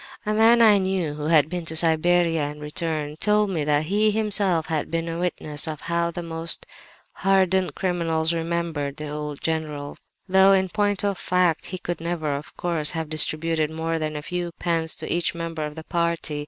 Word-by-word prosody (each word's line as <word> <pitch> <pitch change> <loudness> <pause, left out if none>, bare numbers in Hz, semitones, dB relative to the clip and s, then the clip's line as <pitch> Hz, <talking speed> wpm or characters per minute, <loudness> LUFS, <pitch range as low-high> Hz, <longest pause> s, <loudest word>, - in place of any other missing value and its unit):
"'A 210 - 0
man 230 +2 +5
I 210 -3 +6
knew 185 -5 -1
who 150 0 -6
had 155 -2 +4
been 175 +1 -4
to 160 - -2
Siberia 165 0 +3
and 145 +1 -4
returned, 150 0 -3
told 210 -1 +2
me 160 -5 -1
that 150 +1 +2
he 210 +5 +2
himself 205 -6 +2
had 160 -2 -2
been 165 0 -2
a 165 0 -4
witness 155 -4 -2
of 155 -2 -5
how 170 0 -1
the 170 +1 -5
very 165 - -9
most 165 0 -1 0.5
hardened 190 -1 +2
criminals 165 -3 0
remembered 165 -4 -2
the 150 -1 -6
old 150 -1 -5
general, 155 -3 -3 0.3
though, 190 +1 +6
in 190 -1 +2
point 205 0 0
of 200 -2 -1
fact, 180 -3 +1
he 185 - -5
could 175 -1 -5
never, 165 -3 -2
of 145 +2 -9
course, 165 -4 0
have 160 -2 -3
distributed 155 0 +1
more 160 +1 -2
than 155 -1 -3
a 150 - -5
few 175 +1 -3
pence 165 -2 -1
to - - -3
each 170 0 -1
member 165 -2 -4
of 150 +1 -11
a 160 - -7
party. 170 -3 -1
165 Hz, 195 wpm, -24 LUFS, 155-180 Hz, 0.5 s, I